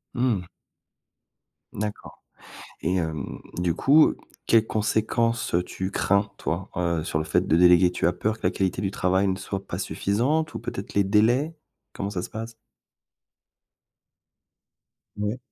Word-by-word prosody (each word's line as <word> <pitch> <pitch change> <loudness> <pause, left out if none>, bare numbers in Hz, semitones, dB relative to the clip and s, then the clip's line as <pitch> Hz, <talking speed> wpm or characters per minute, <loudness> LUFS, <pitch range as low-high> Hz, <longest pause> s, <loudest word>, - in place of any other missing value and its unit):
Mmh. 120 -7 +1 1.3
D'accord. 105 0 -6 0.6
Et 90 +3 0
hem, 80 -3 -3 0.2
du 90 -1 +1
coup 150 - +5 0.3
quelles 115 -1 +4
conséquences, 110 0 0
heu, 90 - +2
tu 95 +1 -4
crains 100 0 +1
toi, 85 +4 -3
heu, 85 -3 0
sur 75 - -2
le 80 - -1
fait - - +2
de 80 - +3
déléguer? 90 0 +6
Tu 90 - -2
as 85 - +3
peur 110 +5 -1
que - - -26
la - - +3
qualité 95 -2 -1
du 95 - -1
travail 95 +1 +1
ne 95 - +1
soit 100 -1 -5
pas 85 - -5
suffisante 135 +12 0
ou - - -4
peut-être 95 - -6
les 100 - +3
délais? 120 - +2 0.4
Comment 100 0 -4
ça 90 -3 -3
se - - -7
passe? 115 +1 -6 2.6
Ouais. 105 +4 -2
100 Hz, 150 wpm, -25 LUFS, 90-110 Hz, 2.6 s, déléguer